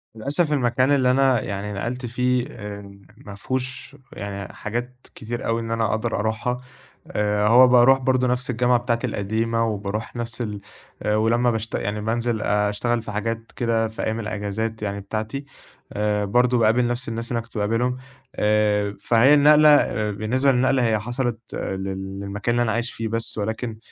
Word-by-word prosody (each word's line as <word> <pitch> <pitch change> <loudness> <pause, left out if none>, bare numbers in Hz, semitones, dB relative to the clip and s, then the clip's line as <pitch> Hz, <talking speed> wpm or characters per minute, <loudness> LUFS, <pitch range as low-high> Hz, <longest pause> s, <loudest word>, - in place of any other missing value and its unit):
للأسف 145 +7 0
المكان 130 0 +2
اللي 130 -3 +4
أنا 130 -3 +3
يعني 105 0 -4
نقَلت 120 +5 -4
فيه 125 +1 0
آآ 100 -2 -9 0.2
ما 105 - -10
فيهوش 130 +5 -4 0.2
يعني 100 0 -6
حاجات 120 +4 -5
كتير 115 +2 -5
أوي 115 0 0
إن 115 0 -5
أنا 115 -1 +1
أقدَر 110 +1 -1
أرُوحها 110 +3 -2 0.5
آآ، 105 0 0
هو 125 +3 +7
بارُوح 125 +1 +6
برضه 130 -1 +1
نَفْس 125 +1 -1
الجامعة 125 0 +3
بتاعتي 120 0 -1
القديمة 115 +2 -1
وبارُوح 105 +1 -4
نَفْس 120 0 -4
ال 105 -3 -4 0.4
آآ 105 - +1
ولمّا 120 +3 +2
باشت 110 0 -3
يعني 105 +1 -2
بانزِل 115 +1 -1
أشتغل 105 +4 0
في 110 - -7
حاجات 115 +2 -3
كده 115 -2 +1
في 110 - -6
أيام 110 +1 -1
الإجازات 110 +1 -3
يعني 100 -1 -3
بتاعتي 110 +7 -4 0.5
آآ 105 0 0
برضه 125 +4 +3
باقابل 115 +2 +3
نَفْس 120 0 -2
الناس 115 +1 -4
اللي 120 - 0
أنا 115 - -4
كنت 115 - -11
باقابلهم، 115 +4 0 0.4
آآ 105 -1 +1
فهي 120 +5 +4
النقلة 150 +1 +7
آآ 110 -7 +3
بالنسبة 125 +7 +1
للنقلة 130 0 +2
هي 110 -1 +1
حصَلِت 120 +1 -2 0.2
لل 95 0 -4
للمكان 100 +4 -2
اللي 120 - +3
أنا 115 - 0
عايش 115 +2 -2
فيه 115 - -4
بس 115 0 -1
ولكن 110 +2 -3
115 Hz, 170 wpm, -23 LUFS, 105-125 Hz, 0.5 s, هو